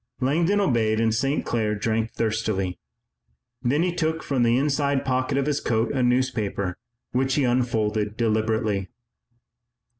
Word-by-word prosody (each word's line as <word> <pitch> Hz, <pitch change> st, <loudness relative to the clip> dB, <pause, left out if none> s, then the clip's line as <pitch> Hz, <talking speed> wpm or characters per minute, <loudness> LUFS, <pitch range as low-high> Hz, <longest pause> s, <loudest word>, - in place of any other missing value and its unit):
Langdon 165 Hz, +10 st, +2 dB
obeyed 115 Hz, -, +2 dB
and 115 Hz, -1 st, +2 dB
St. 135 Hz, +6 st, 0 dB
Clair 110 Hz, -2 st, 0 dB
drank 110 Hz, +2 st, -1 dB
thirstily. 110 Hz, -5 st, -1 dB, 0.8 s
Then 145 Hz, +7 st, +1 dB
he 180 Hz, -1 st, 0 dB
took 160 Hz, -1 st, -1 dB
from 135 Hz, -3 st, 0 dB
the 120 Hz, 0 st, +3 dB
inside 140 Hz, 0 st, +1 dB
pocket 130 Hz, 0 st, 0 dB
of 140 Hz, -, +1 dB
his 150 Hz, -1 st, 0 dB
coat 115 Hz, 0 st, 0 dB
a 135 Hz, -, 0 dB
newspaper 120 Hz, -7 st, 0 dB, 0.4 s
which 130 Hz, +1 st, +1 dB
he 145 Hz, -, +2 dB
unfolded 110 Hz, -4 st, 0 dB
deliberately. 110 Hz, -3 st, 0 dB
120 Hz, 140 wpm, -24 LUFS, 110-135 Hz, 0.8 s, the